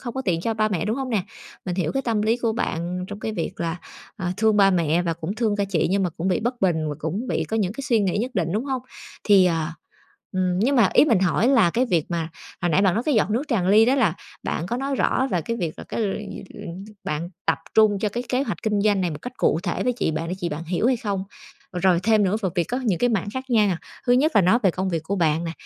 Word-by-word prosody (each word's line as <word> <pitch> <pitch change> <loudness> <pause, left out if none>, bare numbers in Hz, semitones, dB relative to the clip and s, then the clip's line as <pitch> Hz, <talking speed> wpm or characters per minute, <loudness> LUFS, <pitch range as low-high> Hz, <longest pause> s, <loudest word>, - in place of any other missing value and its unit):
không 240 -2 -6
có 265 - -2
tiện 170 -6 0
cho 225 +5 -1
ba 215 0 +1
mẹ, 190 -3 -1
đúng 215 +3 -1
hông 265 -2 -3
nè? 210 -5 +1 0.4
Mình 180 -2 -2
hiểu 175 -5 -1
cái 270 - -1
tâm 225 -4 0
lý 225 +2 +2
của 230 -2 0
bạn 180 -4 -2
trong 205 0 -7
cái 220 - -3
việc 170 -6 -3
là, 170 +1 -2 0.4
à, 180 -3 -2
thương 220 -1 +3
ba 195 -1 +6
mẹ 170 -2 +2
và 170 -1 0
cũng 165 +4 -5
thương 220 -2 0
cả 200 - +1
chị 190 -5 0
nhưng 195 +1 +2
mà 180 - 0
cũng 170 +4 -3
bị 180 - +1
bất 240 +2 -2
bình 160 -5 +1
và 150 - -3
cũng 190 - -3
bị - - 0
có 225 - -3
những 200 -2 0
cái 275 - -7
suy 245 -5 +2
nghĩ 195 -1 0
nhất 250 +3 -3
định, 170 -3 0
đúng 215 +5 -1
hông? 265 -3 -2 0.4
Thì, 200 -3 +6
à, 165 -2 0 0.6
ừm, 185 -1 0
nhưng 260 +8 +2
mà 225 -6 +5
ý - - +7
mình 230 -10 +3
hỏi 190 +5 +2
là 260 -11 +5
cái 250 +7 +1
việc 170 -8 +1
mà, 165 -1 -2 0.3
hồi 175 - +1
nãy 180 +5 +3
bạn 190 -3 +3
nói 230 - 0
cái 300 - +1
giọt 215 -2 +2
nước 235 +6 +1
tràn 190 -8 +1
ly 215 +3 +6
đó 250 +3 +3
là 220 - +2 0.3
bạn 165 - -3
có 240 - -2
nói 275 +2 -2
rõ 265 +1 +1
là 180 - +1
cái 230 +9 -3
việc 170 -6 -3
là - - -7
cái - - -4
luyện 205 -1 -2
gi - - -8 0.6
bạn 155 +3 -3 0.2
tập - - +2 0.2
trung 215 -2 +5
cho 210 - 0
cái 240 +4 -4
kế 255 +2 +1
hoạch - - -4
kinh 210 -3 +1
doanh 205 -2 +2
này 180 -2 0
một 150 0 -7
cách 250 - -6
cụ 160 - +2
thể 175 - -2
với 250 - +2
chị 235 - -1
bạn 160 +2 -3
để 180 - -2
chị 175 -2 -2
bạn 150 +2 -5
hiểu 180 +7 0
hay 255 - +3
không? 200 -4 -3 0.5
Rồi 180 -1 +2
thêm 215 -1 +3
nữa 195 +3 +1
về 190 - +1
việc 175 - +1
có 250 +9 -3
những 195 -8 +1
cái 245 0 +2
mảng 205 -2 -1
khác 260 0 -3
nha. 210 -7 +3 0.3
Thứ 245 - +4
nhất 295 +6 +3
là - - +6
nói 185 +7 +4
về 190 - +4
công 185 +2 -2
việc 165 -3 -1
của 195 +5 -2
bạn 165 -1 +1
nè, 165 - -3
200 Hz, 290 wpm, -23 LUFS, 175-230 Hz, 0.6 s, ý